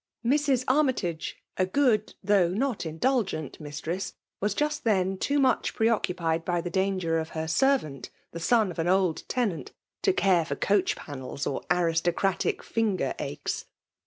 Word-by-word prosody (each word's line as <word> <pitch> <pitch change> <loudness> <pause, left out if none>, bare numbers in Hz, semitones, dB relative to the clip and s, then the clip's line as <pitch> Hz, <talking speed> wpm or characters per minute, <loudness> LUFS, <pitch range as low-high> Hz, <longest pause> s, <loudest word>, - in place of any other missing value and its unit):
Mrs. 275 -1 +2
Armytage, 255 - 0 0.2
a 185 - +2
good, 220 -1 +2
though 195 -3 +4
not 225 +6 -1
indul 225 +11 +1
gent 155 -7 -6
mistress, 155 +5 -4 0.2
was 205 0 0
just 300 0 -1
then 195 -4 +2
too 280 +9 0
much 260 -3 +2
preoccu 220 -5 +1
pied 165 -1 0
by 175 0 0
the 175 +1 -4
danger 185 -3 +1
of 160 0 -4
her 160 0 -2
servant> 160 - +1 0.2
the 170 - -6
son 220 +3 +3
ol 170 - -8
an 165 - -1
old 185 -3 +2
tenant, 225 -10 -1 0.3
to 390 - +3
care 190 - +3
for 160 - -3
coach 200 -2 +2
panels 140 -1 -6
or 135 - -2
Uristocratic 175 +2 +1
finger 220 -4 0
aches. - - -4
190 Hz, 160 wpm, -27 LUFS, 165-235 Hz, 0.3 s, though